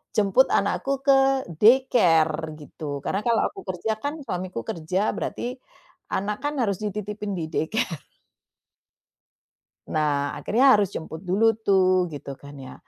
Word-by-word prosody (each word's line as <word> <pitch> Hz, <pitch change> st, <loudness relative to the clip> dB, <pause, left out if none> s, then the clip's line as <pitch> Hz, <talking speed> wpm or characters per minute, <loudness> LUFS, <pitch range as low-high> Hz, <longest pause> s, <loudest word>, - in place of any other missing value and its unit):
jemput 210 Hz, +5 st, +4 dB
anakku 275 Hz, -, -1 dB
ke 270 Hz, -1 st, +4 dB, 0.2 s
daycare 165 Hz, -10 st, +4 dB
gitu. 150 Hz, +1 st, -10 dB, 0.2 s
Karena 195 Hz, -, 0 dB
kalau 230 Hz, -2 st, +3 dB
aku -, -, -11 dB
kerja 185 Hz, +4 st, -2 dB
kan 285 Hz, +1 st, -1 dB
suamiku 180 Hz, -, -4 dB
kerja, 170 Hz, +3 st, -2 dB, 0.2 s
berarti -, -, -4 dB, 0.7 s
anak 210 Hz, +2 st, -1 dB
kan 290 Hz, -, -1 dB
harus 200 Hz, -4 st, 0 dB
dititipin 210 Hz, 0 st, -4 dB
di 165 Hz, -, -2 dB
daycare. 165 Hz, -2 st, -2 dB, 1.8 s
Nah, 145 Hz, -2 st, 0 dB
akhirnya 260 Hz, +3 st, +4 dB
harus 205 Hz, -2 st, +2 dB
jemput 160 Hz, -1 st, -7 dB
dulu 205 Hz, +5 st, +2 dB
tuh, 185 Hz, -3 st, +3 dB
gitu 140 Hz, -1 st, -7 dB
kan 140 Hz, 0 st, -11 dB
ya. 130 Hz, -1 st, -9 dB
190 Hz, 130 wpm, -24 LUFS, 160-220 Hz, 1.8 s, jemput